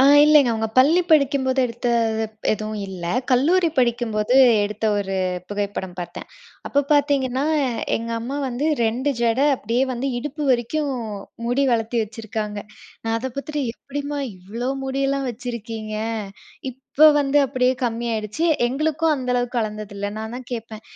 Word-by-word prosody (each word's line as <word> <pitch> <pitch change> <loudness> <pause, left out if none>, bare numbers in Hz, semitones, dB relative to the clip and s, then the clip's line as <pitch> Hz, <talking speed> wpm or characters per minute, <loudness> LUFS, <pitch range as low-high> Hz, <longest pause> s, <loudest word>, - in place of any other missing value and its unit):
ஆ - - +7 0.2
இல்லைங்க 300 -4 +6
அவுங்க 220 0 -1
பள்ளி 310 +7 +6
படிக்கும்போது 275 -3 +3
எடுத்த, 240 +1 -3 0.5
ப் 215 - -7
எதுவும் 215 0 -4
இல்ல. 185 -3 -7 0.3
கல்லூரி 330 +8 +4
படிக்கும்போது 235 -1 +1 0.3
எடுத்த 210 +2 -4
1 195 -1 -2 0.3
புகைப்படம் 200 -3 -4
பார்த்தேன். 175 0 -7 0.4
அப்போ 285 - +2
பாத்தீங்கன்னா, 280 -2 +2 0.5
எங்க 230 +1 -5
அம்மா 260 +5 -4
வந்து 255 +4 -2 0.2
2 250 +6 0
ஜடை, 235 +4 +3
அப்டியே 235 +4 0
வந்து 250 +3 -2
இடுப்பு 295 +4 -5
வரைக்கும் 270 +4 0 0.5
முடி 250 +4 +2
வளத்தி 230 +1 0
வச்சிருக்காங்க. 215 -1 -5 0.5
நான் 225 0 0
அத 250 - -4
பாத்துட்டு, 295 +1 -3
எப்டிம்மா 285 +2 -5 0.2
இவ்வளோ 225 +8 -4
முடியெல்லாம் 275 0 -1
வச்சிருக்கீங்க? 225 -2 -6 1.0
இப்ப 305 - +6
வந்து 285 0 +3
அப்டியே 255 -1 +1
கம்மி 235 -1 -1
ஆயிருச்சு. 215 +8 -2 0.2
எங்களுக்கும் 310 +5 +1
அந்த 255 -2 -5
அளவுக்கு 245 0 -1
வளந்தது 215 -1 -4
இல்ல. 200 0 -3
நான் 220 +1 -5
தான் 255 - -7
கேட்பேன். 225 -2 -6
245 Hz, 140 wpm, -22 LUFS, 220-275 Hz, 1.0 s, ஆ